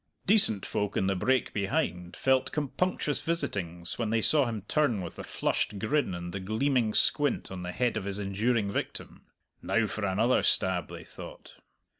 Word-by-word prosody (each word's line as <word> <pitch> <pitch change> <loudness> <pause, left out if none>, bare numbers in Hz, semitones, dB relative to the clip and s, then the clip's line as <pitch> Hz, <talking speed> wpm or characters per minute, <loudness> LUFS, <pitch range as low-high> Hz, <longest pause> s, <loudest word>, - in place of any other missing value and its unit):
Decent 185 - +3
folk 105 -1 -2
in - - +2
the 95 0 +1
brake 130 +8 +1
behind 90 -3 -1
felt 130 -1 +2
compunctious 150 +1 -1
visitings 90 - -2
when 115 -2 0
they 115 +1 +2
saw 140 +4 +4
him 110 -4 -4
turn 120 -5 +1
with 85 - -7
the - - -6
flushed 105 - -1
grin 110 -1 0
and 85 0 -6
the 100 - -3
gleaming 110 +4 +1
squint 145 +1 +2
on 95 -1 -6
the 90 0 -4
head 120 +5 0
of - - -4
his 100 0 -1
enduring 105 +2 0
victim. - - -4 0.4
"Now 115 -1 +1
for 110 0 -4
another 105 +6 +2
stab!" 90 -3 +2
they - - -9
thought. - - -11
105 Hz, 175 wpm, -29 LUFS, 95-130 Hz, 0.4 s, saw